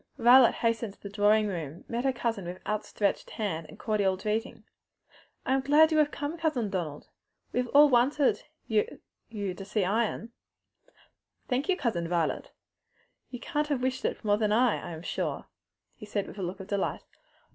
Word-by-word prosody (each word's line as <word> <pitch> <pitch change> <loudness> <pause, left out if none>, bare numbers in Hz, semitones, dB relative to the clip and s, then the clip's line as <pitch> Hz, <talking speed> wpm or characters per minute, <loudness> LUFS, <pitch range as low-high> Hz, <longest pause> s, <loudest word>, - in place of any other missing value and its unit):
Violet 245 +1 +7
hastening 230 -2 -1
to - - -27
the 200 - -8
drawing 210 +1 +3
room, 170 -5 -5
met 240 +2 -3
her 270 - +3
cousin 230 -6 -2
with 180 +1 -6
outstretched 210 -1 -1
hand 165 -7 -3
and - - -12
cordial 200 -4 0
greeting. 215 +5 -3 0.8
"I 260 - +1
am 270 - +2
so 270 - -15
glad 310 +2 +6
you 310 - +3
have 300 -1 +4
come, 295 +3 -5
Cousin 265 -11 0
Donald! 160 -6 -4 0.4
We - - +1
have 250 - 0
all 290 +3 +7
wanted 270 +3 +3 0.2
you 450 +3 0 0.4
to 200 -3 -4
see 200 0 -1
Ion." 225 +3 -1 1.2
"Thank 260 +6 -1
you, 370 - +3
Cousin 195 - -1
Violet; 170 -2 -1 0.8
you 245 - -7
can't 295 +4 -2
have 280 -4 -1
wished 260 +1 -1
it - - -3
more 205 0 +3
than 215 -2 +1
I, 240 +2 +3
I - - -7
am 160 +1 -8
sure," - - -3 0.5
he 210 - -12
said, 205 -1 -2
with 205 - -10
a - - -3
look 180 +3 -4
of 190 - -7
delight. 200 -1 -2
220 Hz, 185 wpm, -28 LUFS, 195-260 Hz, 1.2 s, Violet